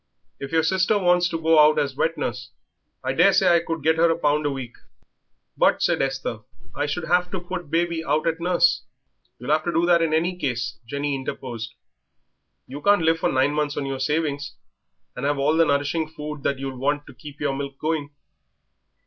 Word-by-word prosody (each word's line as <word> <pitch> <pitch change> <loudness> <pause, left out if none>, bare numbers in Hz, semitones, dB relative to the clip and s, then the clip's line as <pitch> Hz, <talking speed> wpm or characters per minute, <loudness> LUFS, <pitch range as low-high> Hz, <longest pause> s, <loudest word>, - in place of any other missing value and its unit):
"If 140 - -6
your 160 0 +2
sister 190 +5 +2
wants 180 -2 +3
to 165 - -3
go 160 -1 +4
out 150 0 +6
as 140 -2 0
wet 160 +4 0
nurse, 125 +2 -4 0.5
I - - -1
daresay - - +4
I 170 -1 +5
could 165 -2 -5
get 160 +1 +3
her 170 +1 +4
a 165 - +1
pound 150 -2 +1
a - - +1
week." 130 -4 -6 0.8
"But," - - +2
said - - +2
Esther, 135 -4 -2 0.3
"I 145 - -2
should 155 +4 -3
have 180 +1 +2
to 190 - -4
put 175 -2 -6
baby 165 0 0
out 155 +1 0
at 165 0 0
nurse." 170 -6 +3 0.6
"You'll 125 +4 -4
have 155 0 +2
to 175 - 0
do 170 0 +2
that 175 -1 +4
in 165 -1 +1
any 170 +3 +1
case," 120 -9 -3
Jenny 140 +3 -2
interposed; 125 -4 -5 0.9
"you 140 +3 -8
can't 205 -1 +4
live 165 0 +2
for - - +1
nine 130 +2 +2
months 150 -1 -1
on 140 - -2
your 135 -1 -4
savings 145 0 -2 0.6
and 125 - -6
have 145 0 +1
all 140 +3 +2
the 165 0 +4
nourishing 145 +2 0
food 150 -2 -7
that 140 0 -1
you'll 135 -1 -6
want 145 +2 0
to - - -13
keep 145 -2 -12
your 135 - -1
milk 140 0 -5
going." 155 -1 -2
150 Hz, 205 wpm, -23 LUFS, 140-165 Hz, 0.9 s, out